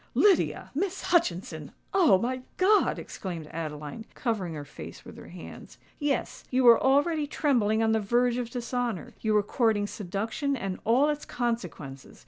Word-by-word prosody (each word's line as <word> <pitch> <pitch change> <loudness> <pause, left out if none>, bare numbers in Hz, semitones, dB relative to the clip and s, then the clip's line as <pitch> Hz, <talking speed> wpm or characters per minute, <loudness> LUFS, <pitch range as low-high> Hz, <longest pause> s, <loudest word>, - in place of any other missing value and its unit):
"Lydia—Miss 385 -2 +2
Hutchinson! 180 - 0 0.2
Oh! 345 - +6
my 255 +6 -2 0.2
God!" 410 +3 +4
exclaimed 170 -5 -6
Adeline, 155 +5 -5
covering 200 -9 -2
her 145 -1 -6
face 145 - -10
with - - -11
her - - -11
hands. - - -11 0.2
"Yes—you 270 -2 -1
were 235 -2 +8
already 290 +3 +3
trembling 225 -8 +1
on 220 - +3
the 220 - +3
verge 240 +3 +2
of 245 -2 -3
dishonour—you 235 - -3
were 210 -1 +4
courting 215 -1 +1
seduction 215 - -2
and 195 -5 -4
all 255 +6 +4
its 295 0 -2
consequences!" 180 - -4
230 Hz, 140 wpm, -28 LUFS, 195-275 Hz, 0.2 s, were